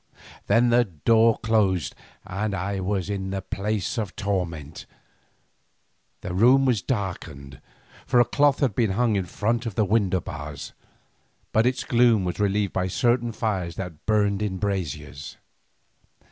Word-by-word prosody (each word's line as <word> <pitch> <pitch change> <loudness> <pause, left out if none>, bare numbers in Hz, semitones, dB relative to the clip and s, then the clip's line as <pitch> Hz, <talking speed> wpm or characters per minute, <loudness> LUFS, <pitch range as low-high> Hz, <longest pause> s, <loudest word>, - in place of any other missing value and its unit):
Then 120 +1 +4
the 120 0 +4
door 110 +6 +3
closed 100 -7 +1 0.3
and 100 +2 -3
I 100 +1 -2
was 95 0 -1
in 95 -2 -3
the 95 -1 -4
place 105 +2 -2
of 105 -4 -4
torment. 85 -7 -3 1.3
The 90 - -5
room 125 +8 +5
was 120 -7 +2
darkened, 80 - -5 0.5
for 125 - +4
a 120 - +6
cloth 145 +2 +2
had 130 -7 +2
been 110 -2 +1
hung 115 +1 +1
in 95 -2 -1
front 115 +6 -1
of 105 - -5
the 110 - +2
window 100 -3 +2
bars, 75 -2 -7 0.8
but 110 +2 +3
its 130 - -1
gloom 115 -5 +3
was 90 - -3
relieved 100 -1 +1
by 95 0 0
certain 120 +3 +1
fires 95 -7 -2
that 90 -4 -8
burned 105 -2 +2
in 100 -3 -2
braziers. 90 -7 -4
100 Hz, 145 wpm, -25 LUFS, 95-115 Hz, 1.3 s, a